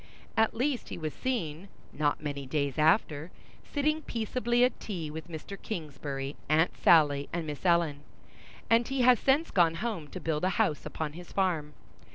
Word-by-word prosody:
At 220 Hz, 0 st, +2 dB
least 255 Hz, +2 st, -1 dB
he -, -, -5 dB
was 155 Hz, -3 st, -4 dB
seen, 195 Hz, -9 st, -3 dB, 0.3 s
not 150 Hz, +1 st, 0 dB
many 140 Hz, -2 st, -4 dB
days 140 Hz, 0 st, -1 dB
after, 155 Hz, -1 st, +2 dB, 0.3 s
sitting 305 Hz, +2 st, 0 dB
peaceably 240 Hz, -1 st, 0 dB
at 250 Hz, -, +2 dB
tea 170 Hz, -8 st, -5 dB
with 160 Hz, +2 st, -7 dB
Mr. 175 Hz, +4 st, -8 dB
Kingsbury, 145 Hz, -6 st, -5 dB
Aunt 160 Hz, +3 st, +3 dB
Sally, 145 Hz, -4 st, +4 dB
and 170 Hz, -1 st, -2 dB
Miss 150 Hz, -2 st, -6 dB
Ellen; 170 Hz, -5 st, +2 dB, 0.7 s
and 230 Hz, +1 st, +4 dB
he 270 Hz, -1 st, 0 dB
has 245 Hz, -1 st, +6 dB
since 280 Hz, +5 st, +2 dB
gone 170 Hz, -3 st, +4 dB
home 185 Hz, -5 st, -3 dB
to 185 Hz, -, -7 dB
build 160 Hz, -2 st, -2 dB
a 185 Hz, -, +3 dB
house 150 Hz, -, +1 dB
upon 155 Hz, -2 st, -4 dB
his 175 Hz, +2 st, -10 dB
farm. 165 Hz, -6 st, 0 dB
165 Hz, 170 wpm, -29 LUFS, 150-225 Hz, 0.7 s, has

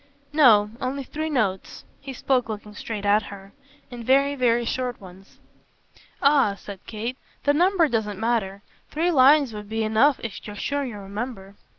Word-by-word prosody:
"No. 220 Hz, -9 st, +5 dB
Only 270 Hz, +2 st, -3 dB
three 310 Hz, +4 st, -4 dB
notes." 205 Hz, -10 st, -2 dB
He 275 Hz, -1 st, -8 dB
spoke 255 Hz, -2 st, 0 dB
looking 210 Hz, -1 st, -7 dB
straight 210 Hz, 0 st, -6 dB
at 205 Hz, +1 st, +4 dB
her. 195 Hz, 0 st, -12 dB, 0.4 s
"And 240 Hz, -1 st, -8 dB
very, 275 Hz, +3 st, +3 dB
very 240 Hz, -3 st, +1 dB
short 250 Hz, +1 st, -3 dB
ones." 190 Hz, 0 st, -15 dB, 0.9 s
"Ah," 275 Hz, -8 st, +4 dB
said 200 Hz, -1 st, -10 dB
Kate, 230 Hz, +4 st, -5 dB, 0.3 s
"the 285 Hz, -, +3 dB
number 350 Hz, +1 st, +3 dB
doesn't 215 Hz, -6 st, -2 dB
matter. 215 Hz, -4 st, -1 dB, 0.3 s
Three 335 Hz, +4 st, 0 dB
lines 280 Hz, -3 st, +5 dB
would 210 Hz, -1 st, -8 dB
be 220 Hz, 0 st, -1 dB
enough 220 Hz, +6 st, +3 dB
if 225 Hz, -3 st, -7 dB
you're 210 Hz, -, -7 dB
sure 285 Hz, +7 st, -2 dB
you 240 Hz, -6 st, -6 dB
remember." 200 Hz, 0 st, -7 dB
230 Hz, 165 wpm, -24 LUFS, 205-275 Hz, 0.9 s, No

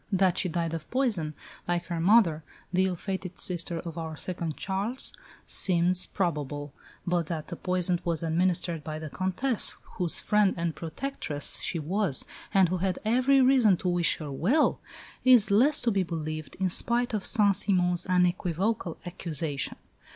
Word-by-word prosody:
That 190 Hz, -2 st, +2 dB
she 185 Hz, -, -1 dB
died 165 Hz, -1 st, -2 dB
of 160 Hz, -2 st, -6 dB
poison, 210 Hz, -, 0 dB, 0.3 s
like 175 Hz, 0 st, -1 dB
her 170 Hz, -1 st, -3 dB
mother, 170 Hz, -4 st, +4 dB, 0.3 s
the 185 Hz, +1 st, +3 dB
ill 185 Hz, -1 st, -1 dB
fated 190 Hz, 0 st, -5 dB
sister 175 Hz, -1 st, -1 dB
of 170 Hz, -1 st, -7 dB
our 160 Hz, -1 st, -5 dB
second 170 Hz, -3 st, -4 dB
Charles, 205 Hz, +7 st, -2 dB, 0.3 s
seems 180 Hz, 0 st, +2 dB
probable; 145 Hz, -6 st, -3 dB, 0.3 s
but 175 Hz, -2 st, 0 dB
that 160 Hz, -2 st, -5 dB
the 175 Hz, -, -5 dB
poison 180 Hz, -1 st, -1 dB
was 170 Hz, -2 st, -1 dB
administered 170 Hz, -1 st, 0 dB
by 155 Hz, 0 st, -5 dB
the 155 Hz, -2 st, -7 dB
Comtesse, 195 Hz, +6 st, 0 dB, 0.2 s
whose 175 Hz, -2 st, +1 dB
friend 210 Hz, -2 st, +2 dB
and 170 Hz, -1 st, -1 dB
protectress 160 Hz, -, -2 dB
she -, -, 0 dB
was 165 Hz, -1 st, -1 dB, 0.3 s
and 190 Hz, -4 st, +4 dB
who 185 Hz, -, 0 dB
had 185 Hz, 0 st, -1 dB
every 255 Hz, +4 st, +4 dB
reason 255 Hz, -7 st, +5 dB
to 180 Hz, -, -2 dB
wish 175 Hz, -1 st, +1 dB
her 150 Hz, -3 st, -6 dB
well, 220 Hz, -, +2 dB, 0.4 s
is 245 Hz, -5 st, +6 dB
less 275 Hz, +9 st, +4 dB
to 235 Hz, -, +1 dB
be 195 Hz, -2 st, +1 dB
believed, 155 Hz, -3 st, -4 dB
in 190 Hz, -1 st, 0 dB
spite 240 Hz, +6 st, 0 dB
of 210 Hz, -3 st, -1 dB
Saint 205 Hz, -3 st, +3 dB
Simon's 180 Hz, -3 st, +1 dB
unequivocal 180 Hz, +1 st, 0 dB
accusation. 160 Hz, -5 st, -4 dB
180 Hz, 160 wpm, -28 LUFS, 165-200 Hz, 0.4 s, is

